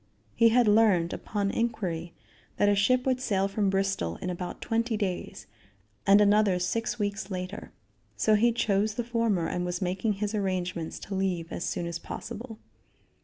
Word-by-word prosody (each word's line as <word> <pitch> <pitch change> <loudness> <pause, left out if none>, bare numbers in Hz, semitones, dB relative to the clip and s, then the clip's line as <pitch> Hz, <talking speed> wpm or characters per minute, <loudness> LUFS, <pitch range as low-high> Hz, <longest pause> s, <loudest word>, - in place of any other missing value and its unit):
He 230 -1 +5
had 240 0 +4
learned, 205 -6 +4
upon 200 -1 -2
inquiry, 175 -8 -2 0.4
that 205 - +3
a 205 - +5
ship 250 +6 +2
would 255 -1 +1
sail 195 -6 +1
from 200 0 0
Bristol 195 - 0
in 180 - -4
about 180 0 -5
twenty 230 0 -1
days, 190 -4 -4 0.6
and 200 +1 +7
another 205 -2 +4
six 230 +7 -1
weeks 205 -2 -2
later. 185 +1 -5 0.5
So 215 - +3
he 230 +3 +4
chose 210 -2 +1
the 240 - -1
former 230 -7 0
and 180 - -2
was 175 0 -2
making 190 +4 0
his 205 +1 -3
arrangements 180 -5 -2
to 200 - -7
leave 185 -3 -1
as 175 - -3
soon 175 - -2
as 170 -1 -4
possible. 225 +6 -7
200 Hz, 170 wpm, -28 LUFS, 180-220 Hz, 0.6 s, and